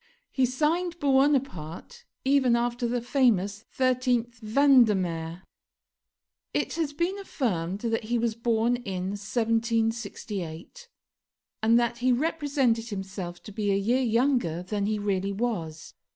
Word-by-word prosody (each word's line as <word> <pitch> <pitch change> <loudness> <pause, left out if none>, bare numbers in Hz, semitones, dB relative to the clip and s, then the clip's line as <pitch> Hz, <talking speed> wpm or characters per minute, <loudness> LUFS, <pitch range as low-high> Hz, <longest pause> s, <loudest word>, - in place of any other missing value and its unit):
He 260 -2 +2
signed 330 +7 0
Buonaparte 270 - 0 0.2
even 265 -3 +4
after 240 +1 0
the 240 +1 -1
famous 220 -6 +1
13th 250 -2 +1
Vendemiaire. 210 - +3 1.1
It - - 0
has 320 -3 -1
been 345 +7 -2
affirmed 195 - -2
that 225 -2 -1
he 240 +2 0
was 230 -1 0
born 230 +1 +1
in 190 -6 -4
1768, 225 - -2 0.7
and 225 +2 +5
that 235 0 -1
he 255 +1 +2
represented 270 -5 +1
himself 190 -3 -6
to 210 - -9
be 205 0 -1
a - - +3
year 230 +7 +1
younger 235 - +1
than 200 +1 -2
he 215 0 0
really 200 -1 -1
was. 195 -8 -3
230 Hz, 125 wpm, -27 LUFS, 200-255 Hz, 1.1 s, and